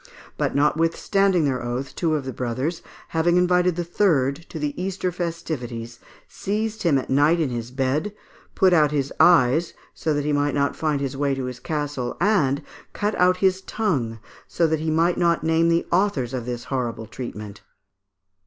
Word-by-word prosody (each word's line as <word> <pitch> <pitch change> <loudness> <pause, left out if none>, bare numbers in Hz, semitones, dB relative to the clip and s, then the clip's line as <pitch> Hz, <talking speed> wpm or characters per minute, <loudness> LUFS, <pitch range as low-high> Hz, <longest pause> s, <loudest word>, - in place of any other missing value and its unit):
But, - - -1
notwithstanding 165 +4 +2
their 130 -3 0
oath, 125 +3 -4
two 160 -3 0
of 145 -3 -3
the 130 - -4
brothers, 130 +7 -3 0.3
having 170 +2 +2
invited 180 -1 +3
the 175 - -2
third 160 -7 +1
to - - -7
the 150 -1 -2
Easter 185 -1 -2
festivities, 140 -10 -5 0.3
seized 215 +2 -3
him 160 -6 +3
at 130 - -4
night 145 +5 +4
in 155 -4 +1
his 120 -1 -4
bed, 135 +9 -1 0.4
put 190 -1 +4
out 155 -3 +5
his 140 -2 -2
eyes 160 0 +4 0.2
so 160 - -2
that 145 0 -1
he 150 - +1
might 145 0 +1
not 140 0 +1
find 145 -3 -1
the 135 +1 -8
way 140 -1 +1
to 135 -1 -3
his 125 -1 -6
castle, 145 -3 -3
and 165 -8 +2 0.3
cut 205 +1 -1
out 180 0 +4
his 190 0 +2
tongue 140 - -1 0.3
so 170 - +1
that 160 -1 +1
he 160 +1 -2
might 165 +3 +2
not 170 -1 +2
name 165 +1 +3
the 170 0 +2
authors 170 - +1
of 125 -2 -4
this 120 -1 -4
horrible 120 -3 -2
treatment. 105 -3 -8
150 Hz, 180 wpm, -23 LUFS, 130-175 Hz, 0.4 s, out